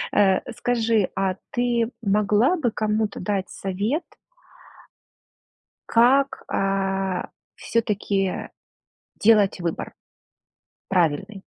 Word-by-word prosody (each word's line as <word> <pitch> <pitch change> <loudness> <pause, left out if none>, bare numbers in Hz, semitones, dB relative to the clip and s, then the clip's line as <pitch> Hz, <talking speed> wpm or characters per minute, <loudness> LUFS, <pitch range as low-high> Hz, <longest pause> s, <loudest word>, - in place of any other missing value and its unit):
Э, 195 -2 +4 0.2
скажи, 230 -4 +1
а 190 -1 0
ты 240 -1 0
могла 210 - +3
бы 295 -9 0
кому-то 215 -1 -1
дать 190 -1 -2
совет 205 - -2 1.9
как, 265 +4 +3
э, 195 -1 0 0.3
всё-таки 200 -4 -1 0.7
делать 205 -3 +4
выбор 170 -2 -4 0.9
правильный? 190 +3 0
205 Hz, 80 wpm, -23 LUFS, 195-230 Hz, 1.9 s, Э